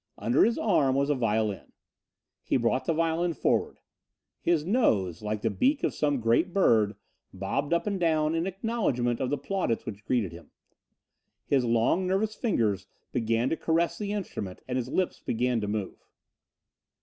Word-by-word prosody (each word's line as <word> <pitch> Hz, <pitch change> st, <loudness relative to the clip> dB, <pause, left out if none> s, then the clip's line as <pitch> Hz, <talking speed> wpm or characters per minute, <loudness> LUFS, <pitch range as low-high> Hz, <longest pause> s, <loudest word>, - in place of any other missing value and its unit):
Under 120 Hz, +4 st, +3 dB
his 230 Hz, +1 st, +2 dB
arm 155 Hz, -11 st, +2 dB
was 140 Hz, +1 st, +2 dB
a -, -, +4 dB
violin. 110 Hz, -4 st, -1 dB, 0.7 s
He -, -, +1 dB
brought 125 Hz, +2 st, 0 dB
the 165 Hz, -, +1 dB
violin 165 Hz, +1 st, 0 dB
forward. -, -, 0 dB, 0.6 s
His 165 Hz, -3 st, +1 dB
nose, 100 Hz, -, +1 dB
like 105 Hz, 0 st, -3 dB
the 115 Hz, -, +1 dB
beak 275 Hz, -, +1 dB
of -, -, +1 dB
some 145 Hz, -3 st, 0 dB
great 120 Hz, +10 st, +2 dB
bird, 110 Hz, -, +3 dB, 0.4 s
bobbed 100 Hz, -, -3 dB
up 170 Hz, -, +1 dB
and 200 Hz, -2 st, -1 dB
down 155 Hz, -2 st, +2 dB
in 165 Hz, +2 st, 0 dB
acknowledgment 190 Hz, -, -1 dB
of 130 Hz, -, -1 dB
the 145 Hz, -, 0 dB
plaudits 185 Hz, -, -2 dB
which 105 Hz, 0 st, -7 dB
greeted 115 Hz, -8 st, 0 dB
him. 85 Hz, -3 st, -12 dB, 1.0 s
His 135 Hz, -3 st, +2 dB
long 120 Hz, +11 st, +2 dB
nervous 200 Hz, +4 st, 0 dB
fingers 110 Hz, -, 0 dB, 0.2 s
began 115 Hz, 0 st, 0 dB
to -, -, +2 dB
caress 165 Hz, +1 st, 0 dB
the 205 Hz, -1 st, -3 dB
instrument 140 Hz, -, -5 dB
and 125 Hz, -, -3 dB
his 125 Hz, -1 st, -2 dB
lips 185 Hz, +5 st, -1 dB
began 120 Hz, 0 st, 0 dB
to 105 Hz, -, -2 dB
move. 105 Hz, -2 st, -4 dB
130 Hz, 165 wpm, -28 LUFS, 110-175 Hz, 1.0 s, a